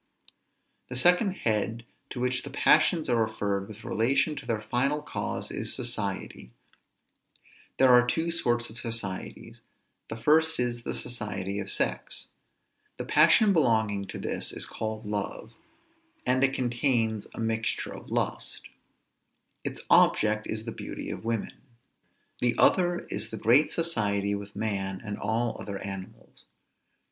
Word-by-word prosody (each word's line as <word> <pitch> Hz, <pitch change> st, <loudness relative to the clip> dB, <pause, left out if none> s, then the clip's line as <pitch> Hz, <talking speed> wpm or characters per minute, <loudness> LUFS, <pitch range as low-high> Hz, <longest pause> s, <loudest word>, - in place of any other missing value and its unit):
The 125 Hz, -, -5 dB
second 180 Hz, -, +4 dB
head 115 Hz, -, -1 dB, 0.2 s
to -, -, -6 dB
which 125 Hz, +1 st, 0 dB
the 140 Hz, -, -8 dB
passions 155 Hz, +3 st, +3 dB
are 120 Hz, -2 st, +3 dB
referred 100 Hz, -3 st, -2 dB
with 110 Hz, 0 st, -11 dB
relation 135 Hz, +7 st, +1 dB
to 135 Hz, -, -8 dB
their 115 Hz, -3 st, 0 dB
final 125 Hz, +7 st, 0 dB
cause, 150 Hz, -, -4 dB
is -, -, -1 dB
society. 105 Hz, -, -2 dB, 1.3 s
There 130 Hz, -1 st, +6 dB
are 125 Hz, 0 st, +7 dB
two 165 Hz, +6 st, 0 dB
sorts 120 Hz, -8 st, 0 dB
of 115 Hz, -, -5 dB
societies. 115 Hz, -5 st, -4 dB, 0.5 s
The 110 Hz, -, -5 dB
first 160 Hz, +6 st, +3 dB
is, 120 Hz, -1 st, -1 dB
the -, -, -2 dB
society 105 Hz, -4 st, -3 dB
of 100 Hz, -1 st, -5 dB
sex. -, -, -1 dB, 0.7 s
The -, -, -5 dB
passion 210 Hz, -3 st, +5 dB
belonging 110 Hz, -, +2 dB
to -, -, -7 dB
this -, -, -1 dB
is -, -, +2 dB
called 110 Hz, 0 st, -5 dB
love, 105 Hz, -1 st, -4 dB, 0.7 s
and 130 Hz, +1 st, +2 dB
it 135 Hz, 0 st, +3 dB
contains 120 Hz, -3 st, 0 dB
a -, -, -8 dB
mixture 115 Hz, 0 st, -1 dB
of -, -, -11 dB
lust; -, -, -2 dB, 1.0 s
its -, -, -4 dB
object 110 Hz, 0 st, +4 dB
is 110 Hz, 0 st, -4 dB
the 115 Hz, -, -4 dB
beauty -, -, -6 dB
of -, -, -7 dB
women. 115 Hz, -2 st, -3 dB, 0.8 s
The 120 Hz, -1 st, +1 dB
other 175 Hz, -1 st, +3 dB
is -, -, -2 dB
the 110 Hz, -, -6 dB
great 125 Hz, +8 st, +4 dB
society 105 Hz, -11 st, 0 dB
with 100 Hz, 0 st, -6 dB
man 95 Hz, -3 st, -2 dB
and 105 Hz, -1 st, -4 dB
all 115 Hz, +3 st, -1 dB
other 100 Hz, -2 st, -5 dB
animals. 95 Hz, -1 st, -9 dB
115 Hz, 140 wpm, -28 LUFS, 105-130 Hz, 1.3 s, are